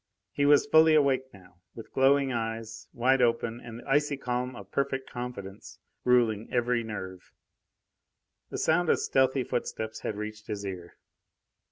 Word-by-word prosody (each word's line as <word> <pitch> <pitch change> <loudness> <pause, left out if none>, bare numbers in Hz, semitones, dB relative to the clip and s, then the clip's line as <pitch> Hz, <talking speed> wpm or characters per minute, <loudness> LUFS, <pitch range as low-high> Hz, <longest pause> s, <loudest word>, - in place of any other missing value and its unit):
He 145 0 +1
was 145 +4 +6
fully 160 -5 +6
awake 135 -3 +2
now, 90 -3 -18 0.2
with 115 - -10
glowing 135 0 +3
eyes 115 -1 -4
wide 130 +2 +2
open 115 -1 +1
and 115 -1 -8
the 120 - -12
icy 145 +1 +2
calm 125 -1 -3
of 100 -3 -11
perfect 135 -1 -1
confidence 115 -6 -8 0.3
ruling 115 -4 +2
every 120 -1 +1
nerve. 95 -4 -7 1.2
The - - -5
sound 160 +2 +2
of - - +4
stealthy 130 0 +2
footsteps 110 -2 -4
had 105 - -4
reached 105 +1 -7
his 105 -2 -4
ear. 90 -3 -7
120 Hz, 150 wpm, -28 LUFS, 110-135 Hz, 1.2 s, was